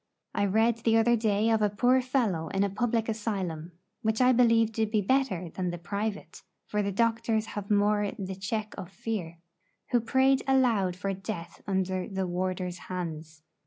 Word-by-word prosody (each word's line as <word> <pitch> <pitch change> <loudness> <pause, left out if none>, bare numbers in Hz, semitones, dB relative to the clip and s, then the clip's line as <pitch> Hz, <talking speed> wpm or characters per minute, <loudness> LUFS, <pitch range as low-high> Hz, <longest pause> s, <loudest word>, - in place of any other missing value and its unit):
I 200 - +1
read 225 +3 +2
the 225 -1 +3
other 240 +1 +4
day 215 0 +1
of 220 -1 +2
a 210 - +3
poor 245 +5 +3
fellow 230 -11 0
in 195 +4 0
a 200 - 0
public 225 +2 0
asylum 190 -7 -3 0.3
(which 220 -1 0
I 255 0 +5
believe 230 -2 +4
to 220 0 0
be 215 0 +1
better 200 -6 0
than 180 +1 -2
the 175 - -4
'private,' 200 +4 -4 0.2
for 210 - -1
the 200 0 -1
doctors 225 +1 +1
have 205 -1 -5
more 205 0 +2
the 190 -1 -4
check 210 +3 -3
of 180 - -7
fear) 195 -5 -5 0.5
who 240 -2 +3
prayed 265 +3 +3
aloud 235 -9 +3
for 195 +2 -2
death 190 -3 -7
under 190 -1 -1
the 190 -1 -2
warder's 180 0 -3
hands. 160 -3 -6
205 Hz, 175 wpm, -28 LUFS, 185-225 Hz, 0.5 s, I